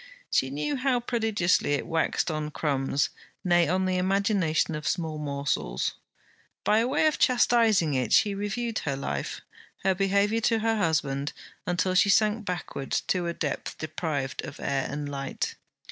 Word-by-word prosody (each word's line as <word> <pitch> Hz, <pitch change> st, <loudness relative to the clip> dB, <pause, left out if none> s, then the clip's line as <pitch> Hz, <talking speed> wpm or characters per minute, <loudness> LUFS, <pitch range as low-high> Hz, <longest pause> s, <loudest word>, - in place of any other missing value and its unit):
She 130 Hz, -, +2 dB
knew 150 Hz, -, -2 dB
how 255 Hz, -1 st, +1 dB
prodigiously 220 Hz, -10 st, +1 dB
it 145 Hz, -, -1 dB
waxed 165 Hz, +1 st, 0 dB
on 155 Hz, -1 st, -2 dB
crumbs; 140 Hz, -2 st, 0 dB, 0.3 s
nay, 175 Hz, -2 st, +4 dB
on 185 Hz, +2 st, +1 dB
the 185 Hz, 0 st, +1 dB
imagination 185 Hz, -5 st, +1 dB
of 150 Hz, 0 st, -4 dB
small 160 Hz, -3 st, -1 dB
morsels. 140 Hz, -, -1 dB, 0.7 s
By 215 Hz, +2 st, +3 dB
way 275 Hz, +5 st, +2 dB
of 310 Hz, -, +2 dB
chastizing 225 Hz, -, +4 dB
it, 125 Hz, -4 st, 0 dB
she 205 Hz, -2 st, +4 dB
reviewed 220 Hz, +3 st, -2 dB
her 140 Hz, -2 st, -2 dB
life, 70 Hz, -, -4 dB, 0.4 s
her 190 Hz, 0 st, +3 dB
behaviour 200 Hz, +3 st, +2 dB
to 230 Hz, 0 st, +3 dB
her 225 Hz, 0 st, +1 dB
husband, 145 Hz, -6 st, 0 dB, 0.3 s
until 180 Hz, +1 st, +1 dB
she 185 Hz, +2 st, +4 dB
sank 215 Hz, +1 st, +3 dB
backward 175 Hz, -6 st, -4 dB, 0.2 s
to 180 Hz, -2 st, +1 dB
a 170 Hz, -, -1 dB
depth 150 Hz, -3 st, -3 dB
deprived 155 Hz, -4 st, -3 dB
of -, -, -8 dB
air 135 Hz, -1 st, -1 dB
and 145 Hz, +1 st, -4 dB
light. 140 Hz, -1 st, -3 dB
175 Hz, 155 wpm, -27 LUFS, 145-210 Hz, 0.7 s, nay